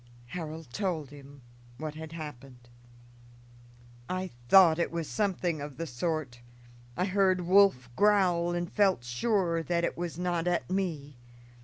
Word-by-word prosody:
Harold 160 -1 -6
told 165 -8 -2
him 140 -2 -13 0.3
what 155 0 -5
had 160 0 -8
happened. 135 -6 -9 1.4
"I 185 -1 -3 0.2
thought 175 -4 +7
it 170 - 0
was 165 -2 -3
something 180 -6 -1
of 145 -2 -7
the 165 - -3
sort. 145 -2 -3 0.6
I 180 - +1
heard 190 -1 +2
Wolf 180 -8 +4
growl 185 -4 +3
and 175 0 -3
felt 195 -10 +3
sure 170 - 0
that 170 +1 -1
it - - -1
was 170 -2 -4
not 175 -1 -1
at 175 -1 0
me. 155 -8 -3
170 Hz, 140 wpm, -29 LUFS, 150-185 Hz, 1.4 s, thought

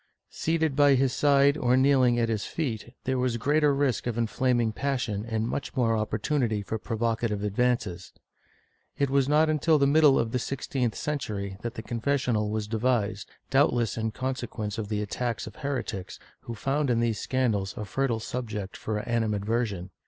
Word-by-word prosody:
Seated 160 -3 0
by 145 -1 +5
his 130 -1 +2
side 140 0 +4
or 125 -2 +2
kneeling 130 -3 +4
at 115 -1 +2
his 110 -3 -1
feet, 120 -6 -4
there 130 0 0
was 125 -2 0
greater 145 +5 +3
risk 140 -4 0
of 120 -1 -2
inflaming 120 0 +1
passion 125 -5 -2
and 110 -1 -2
much 140 - -4
more 115 -3 +3
oppor 110 0 -1
tunity 110 -4 0
for 110 - -3
provocative 115 -2 -1
advances. 105 -4 -1 0.9
It 140 -1 +1
was 140 0 +2
not 155 +2 +4
until 155 +1 +3
the 140 - +3
middle 145 -1 +5
of 115 -1 0
the 125 - 0
sixteenth 125 -2 -2
century 105 -10 -3
that 120 +1 -5
the 110 - -6
confessional 120 -3 0
was 105 0 -2
devised, 110 -3 0 0.2
doubtless 130 -5 +2
in 110 0 -1
consequence 115 -3 -4
of 105 -2 -4
the 105 -1 -1
attacks 115 +2 -3
of 110 - -10
heretics, 125 -9 -4 0.2
who 115 - -7
found 135 +5 0
in 120 -1 +2
these 115 -3 0
scandals 110 -7 -1
a 105 - -4
fertile 120 +3 -1
subject 110 -5 -5
of 105 -1 -1
animadversion. 110 -4 -1
120 Hz, 170 wpm, -27 LUFS, 110-135 Hz, 0.9 s, by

